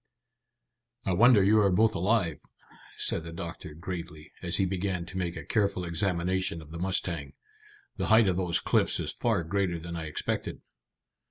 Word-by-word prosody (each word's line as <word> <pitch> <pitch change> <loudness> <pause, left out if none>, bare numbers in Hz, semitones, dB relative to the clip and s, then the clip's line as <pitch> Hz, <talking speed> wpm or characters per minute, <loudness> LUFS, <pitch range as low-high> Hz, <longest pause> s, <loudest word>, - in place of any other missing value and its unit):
"I 95 - +1
wonder 115 +1 +6
you 105 +3 +5
are 100 -2 +4
both 110 +4 +3
alive," 90 -5 +1 0.6
said 80 - 0
the 85 - -7
doctor 85 -3 -7
gravely, 85 -2 -7
as - - 0
he 95 - +2
began 95 -1 -2
to 95 +1 -7
make 85 -2 -2
a 75 - -7
careful 100 -3 0
examination 90 0 0
of 80 -1 -13
the 85 - -6
mustang. 85 -5 -2 0.6
"The - - -1
height 110 -1 +6
of 95 - +2
those 90 -2 +1
cliffs - - +2
is - - -1
far 110 -7 0
greater 90 0 -1
than 85 +1 -6
I 80 -1 -4
expected." 75 - -3
90 Hz, 170 wpm, -28 LUFS, 85-100 Hz, 0.6 s, wonder